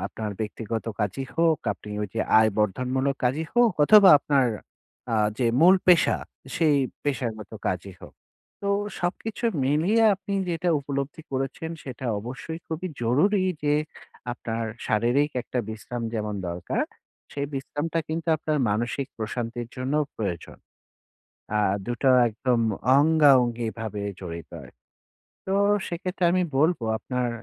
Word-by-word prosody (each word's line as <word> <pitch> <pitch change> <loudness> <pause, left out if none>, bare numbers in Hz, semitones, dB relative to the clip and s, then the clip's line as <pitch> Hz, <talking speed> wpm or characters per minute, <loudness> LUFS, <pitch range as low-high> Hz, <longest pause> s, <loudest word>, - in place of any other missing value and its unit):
আপনার 110 -1 -5
ব্যক্তিগত 110 +1 -4 0.2
কাজই 105 +6 -1
হোক, 165 -2 +3
আপনি 105 +1 -12
ওই 105 - -1
যে 115 - 0 0.2
আয় 110 0 +5
বর্ধনমূলক 130 +6 0
কাজই 140 +6 +1
হোক, 240 -3 +5
অথবা 200 +3 +8
আপনার 140 -3 +2 0.6
আ - - -1 0.3
যে 125 - +1 0.2
মূল 180 +3 +8
পেশা 180 -3 +5 0.4
সেই 155 -3 +3 0.3
পেশাগত 115 -7 -3 0.2
কাজই 95 +1 -2
হোক। - - -12 0.5
তো 200 - -3 0.3
সবকিছু 210 +6 -3 0.2
মিলিয়ে 165 +12 +2
আপনি 200 +1 -7 0.2
যেটা 175 +1 -1
উপলব্ধি 140 +2 -4
করেছেন। 135 +4 -3
সেটা 130 -1 -6
অবশ্যই 135 +8 -6
খুবই 165 +3 -4
জরুরি 180 - +3 0.2
যে 145 0 +2 0.6
আপনার 115 -1 -4 0.2
শারীরিক 120 +7 +2
একটা 125 - -4
বিশ্রাম 110 +2 -6
যেমন 105 -1 -2
দরকার, 85 +1 -2 0.5
সেই 140 0 -2
বিশ্রামটা 145 +4 -3
কিন্তু 165 +1 -3
আপনার 155 0 -1
মানসিক 120 +5 -1
প্রশান্তির 115 +1 -4
জন্যও 140 +4 0
প্রয়োজন। 95 -6 -4 1.0
আ - - +3 0.3
২ 120 - -2
টো 135 - +4 0.2
একদম 120 +2 0 0.4
অঙ্গাঅঙ্গিভাবে 120 -8 +3 0.2
জড়িত 85 -3 -7
হয়। - - -13 0.8
তো 190 - -1 0.4
সেক্ষেত্রে 180 +1 -3
আমি 185 0 +2
বলব 160 +5 +3 0.2
আপনার 125 +1 -2
135 Hz, 130 wpm, -25 LUFS, 115-160 Hz, 1.0 s, অথবা